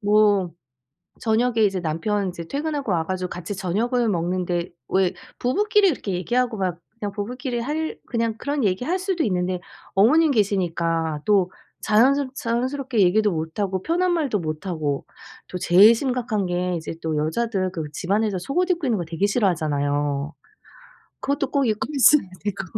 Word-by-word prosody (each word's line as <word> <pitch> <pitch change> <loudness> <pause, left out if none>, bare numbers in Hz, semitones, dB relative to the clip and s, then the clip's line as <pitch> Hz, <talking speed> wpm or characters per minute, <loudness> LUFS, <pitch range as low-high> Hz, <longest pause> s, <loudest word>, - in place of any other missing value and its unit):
뭐 205 -3 +3 0.7
저녁에 230 +1 +1
이제 195 -2 0
남편 190 +5 -1
이제 170 -2 -7
퇴근하고 285 - -2
와 165 -3 +1
가지고 185 +1 -3
같이 180 +3 -5
저녁을 225 +6 0
먹는데 175 -1 -1 0.2
왜 190 -2 +2 0.2
부부끼리 405 - +3
그렇게 210 -9 -4
얘기하고 235 +6 0
막 180 -3 -2 0.2
그냥 205 -2 -3
부부끼리 240 +5 -4
할 305 +6 -3
그냥 230 -2 -1
그런 285 -1 -1
얘기할 245 - 0
수도 375 -3 -1
있는데 180 -2 0 0.3
어머님 295 +10 +5
계시니까 170 - 0
또 195 -3 +3 0.3
자연스 265 +6 +3
자연스럽게 255 0 -1
얘기도 205 +3 +4
못 160 +2 -4
하고 190 -2 -1
편한 360 +2 +1
말도 285 -11 0
못 155 +1 -5
하고. 150 -6 -2 0.4
또 180 - -5
제일 195 +5 +7
심각한 240 -5 -1
게 180 0 -1
이제 165 -1 -5
또 160 -1 -1
여자들 185 +5 -1
그 165 -3 -4
집안에서 200 +2 0
속옷 355 - -1
입고 335 -6 -1
있는 230 - +1
거 175 - -3
되게 165 +4 -1
싫어하잖아요. 145 - 0 0.9
그것도 280 0 -1
꼭 280 -1 +2
입고 215 -1 -1
있어야 275 -2 +6 0.2
되고 200 -2 -2
205 Hz, 345 characters per minute, -23 LUFS, 180-250 Hz, 0.9 s, 제일